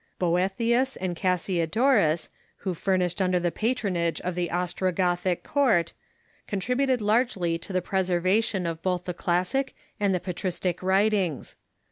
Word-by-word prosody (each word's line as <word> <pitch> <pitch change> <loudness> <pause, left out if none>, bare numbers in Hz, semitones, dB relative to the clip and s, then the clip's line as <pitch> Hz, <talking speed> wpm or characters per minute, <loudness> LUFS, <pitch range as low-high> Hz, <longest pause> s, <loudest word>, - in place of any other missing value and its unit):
Boethius 210 +9 +1
and 180 -2 -3
Cas 180 0 0
siodorus, 180 - +2 0.4
Avho 185 - 0
flourished 180 0 0
under 180 -1 +2
the 175 0 0
patronage 195 -8 -1
of 180 - -2
the 175 -1 -2
Ostro 180 +1 -1
gothic 180 0 0
court, 230 - +2 0.5
contributed 250 +5 0
largely 210 -6 +1
to 195 - -9
the 185 -2 0
preservation 185 +1 +1
of 165 -1 -3
both 180 -1 -1
the 180 - -3
classic 180 +11 0 0.2
and 200 -1 +2
the 180 - +1
patristic 180 0 -2
Avritings. 190 -4 +1
185 Hz, 135 wpm, -26 LUFS, 175-210 Hz, 0.5 s, siodorus